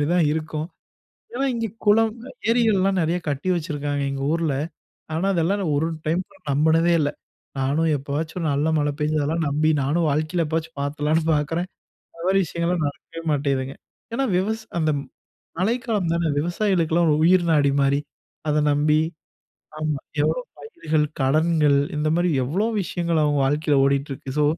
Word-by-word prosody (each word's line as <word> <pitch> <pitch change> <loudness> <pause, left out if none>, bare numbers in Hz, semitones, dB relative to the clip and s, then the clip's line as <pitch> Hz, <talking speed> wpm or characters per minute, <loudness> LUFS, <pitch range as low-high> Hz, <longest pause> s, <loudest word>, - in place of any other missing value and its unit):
மாதிரி 145 - +1
தான் 175 -3 +4
இருக்கும். 155 0 -3 0.7
ஏன்னா 270 +2 0
இங்கே 230 -1 -2 0.2
குளம் 220 +1 +4 0.4
ஏரிகள்லாம் 200 -5 +3
நெறைய 170 +3 0
கட்டி 145 +5 -2
வச்சுருக்காங்க 145 -3 -2
எங்கள் 135 +1 -2
ஊர்ல. 165 -4 0 0.6
ஆனா, 175 +5 0
அதெல்லாம் 180 +4 +1
நான் 160 -6 0
ஒரு 160 +3 +1 0.2
டைம் 170 +4 +1 0.3
நம்புனதே 160 +4 +3
இல்ல. 145 -1 +1 0.5
நானும் 145 +5 +1
எப்போவாச்சும் 145 +5 -4
ஒரு 165 - -2
நல்ல 145 +3 +1
மழை 145 0 +1
பெஞ்சதெல்லாம் 155 +1 0
நம்பி 155 +2 +2
நானும் 155 +4 +1
வாழ்க்கையில 155 +4 0
எப்போவாச்சும் 160 0 -3
பார்த்துலாம்னு 150 +3 0
பார்க்குறேன், 165 +5 -1 0.5
அந்த 165 - -10
மாதிரி 195 +1 +4
விஷயங்கள்லாம் 170 0 -1
நடக்கவே 165 +3 -10
மாட்டேங்குதுங்க. 135 -2 -1 0.4
ஏன்னா 270 - +1
விவசா 220 +4 -1 0.2
அந்த 155 -1 +2 0.7
மழைக்காலம் 220 -3 0
தானே 170 -1 +1
விவசாயிகளுக்கெல்லாம் 175 0 +1
ஒரு 150 - +3
உயிர் 180 0 +5
நாடி 145 -3 +4
மாரி. 140 +1 +2 0.5
அதை 150 0 +2
நம்பி 150 +1 +3 0.8
ஆமா, 155 -2 -1 0.2
எவ்வளோ - - +1 0.2
பயிர்கள் 160 - -1 0.2
கடன்கள் 150 +1 +3 0.2
இந்த 150 +1 0
மாரி 175 +1 +2 0.2
எவ்வளோ 185 - 0 0.2
விஷயங்கள் 170 -2 -1
அவங்க 145 -1 +2
வாழ்க்கையில் 145 0 +2
ஓடிட்டு 140 +1 +1
இருக்கு. 135 0 -7
ஸோ, 150 - +4
160 Hz, 150 wpm, -23 LUFS, 145-175 Hz, 0.8 s, உயிர்